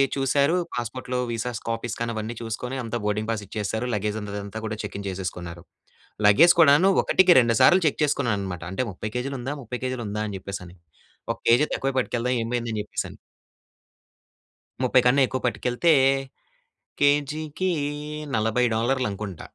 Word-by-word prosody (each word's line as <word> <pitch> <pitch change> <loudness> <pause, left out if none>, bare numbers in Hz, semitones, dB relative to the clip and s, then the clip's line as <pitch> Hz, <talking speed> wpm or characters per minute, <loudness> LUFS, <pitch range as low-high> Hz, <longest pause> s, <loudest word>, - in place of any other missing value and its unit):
చూశారు 140 +4 +2 0.2
పాస్‌పోర్ట్‌లో 125 +1 -4
visas, 115 0 -3
copies 115 0 -3
కాని 115 0 -2
అవన్నీ 110 +2 -4
చూసుకొని 115 +3 -4
అంతా 115 +1 -3
బోర్డింగ్ 105 +2 -1
పాస్ 105 -2 -3
ఇచ్చేశారు. 110 +3 -3
లగేజ్ 105 +1 -2
ఉన్నదంతా 100 0 -5
అంతా 110 +2 -6
కూడా 110 0 -3
చెక్ 105 - -6
ఇన్ 100 - -7
చేసేసుకున్నారు. 90 -2 -6 0.6
లగేజ్ 165 +12 +7
కూడాను 160 +5 +6
ఒకటికి, 185 -1 +4
రెండు 115 -2 +2
సార్లు 185 +1 +6
చెక్ 145 - -1
చేసుకున్నాననమాట. 100 - -1
అంటే, 110 +7 -1
"30 105 +4 -6
కేజీలు 135 +2 -2
ఉందా? 135 +4 -3
30 125 +1 -6
కేజీలు 130 -3 -3
ఉందా?" 105 +1 -2
అని 100 - -5
చెప్పేసని. 90 -2 -8 0.5
ఒక - - -5
కేజీ 120 +6 +5
తక్కువే 135 0 -1
పట్టుకెళ్దాం 125 0 -1
ఏమైంది 120 0 -2
అని 105 - -2
చెప్పేసని. - - -5 1.7
30 130 0 +4
కన్నా 135 +3 +4
ఎక్కువ 130 - -3
పట్టుకెళ్తే, 125 +7 +1 1.1
కేజీకి 150 +5 +1 0.6
40 110 +3 +1
డాలర్లనుకుంట. 110 -6 -2
120 Hz, 145 wpm, -24 LUFS, 105-135 Hz, 1.7 s, లగేజ్